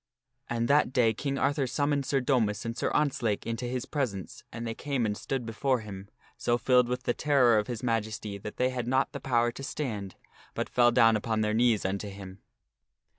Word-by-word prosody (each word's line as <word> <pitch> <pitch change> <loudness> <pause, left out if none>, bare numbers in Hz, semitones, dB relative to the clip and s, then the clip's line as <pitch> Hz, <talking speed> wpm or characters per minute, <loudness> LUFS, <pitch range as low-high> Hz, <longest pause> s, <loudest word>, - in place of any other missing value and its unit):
And 120 0 0
that 145 -1 +3
day 120 -4 +3
King 140 +4 -3
Arthur 140 -1 +1
summoned 145 +1 0
Sir 135 -2 +1
Domas 115 -6 +1
and 115 0 -3
Sir - - -1
Ontzlake 120 -8 0
into 115 +2 -3
his 125 0 -3
presence 110 - -4
and 115 +1 -6
they 115 - -2
came 135 -2 -2
and 105 -1 -1
stood 130 +3 -3
before 120 +3 0
him, 100 -2 -9 0.3
so 120 0 +1
filled 125 +1 +4
with 125 0 -2
the 120 - +1
terror 125 -7 +4
of 105 - -3
his 120 -2 -5
majesty, 110 -3 -2
that 105 +2 -8
they 130 +1 +2
had 125 -2 -3
not 130 +2 +1
the 140 - -6
power 120 -3 +1
to 125 - -9
stand, 120 -9 -4 0.4
but - - -2
fell 120 -1 +4
down 115 -1 +5
upon 110 0 -1
their 105 0 +1
knees 115 -3 +2
unto 100 +2 -2
him. 95 0 -10
120 Hz, 205 wpm, -29 LUFS, 110-130 Hz, 0.4 s, down